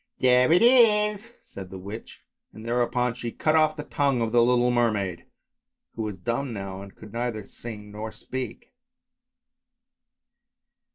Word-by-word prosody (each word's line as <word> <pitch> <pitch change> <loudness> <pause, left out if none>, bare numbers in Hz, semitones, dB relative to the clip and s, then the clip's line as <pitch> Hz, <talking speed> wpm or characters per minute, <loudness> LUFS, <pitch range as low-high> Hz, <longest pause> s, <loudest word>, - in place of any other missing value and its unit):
" - - -47
There 125 +2 +4
it 175 +6 +5
is," 225 -2 +4
said 95 -2 -10
the 95 - -8
witch, 100 +5 -9 0.3
and 110 - -11
thereupon 120 0 0
she 120 -1 -5
cut 155 +6 +1
off 155 0 +3
the 150 - -4
tongue 140 -3 0
of 115 -1 -1
the 120 0 +5
little 125 +1 +3
mermaid, 105 -7 0 0.7
who 115 - -5
was 105 -2 -3
dumb 120 +8 -3
now 95 -2 -6
and 100 -1 -12
could 105 - -13
neither 115 -3 -3
sing 105 -1 -9
nor 110 +1 -6
speak. 130 - -7
120 Hz, 155 wpm, -26 LUFS, 105-140 Hz, 0.7 s, it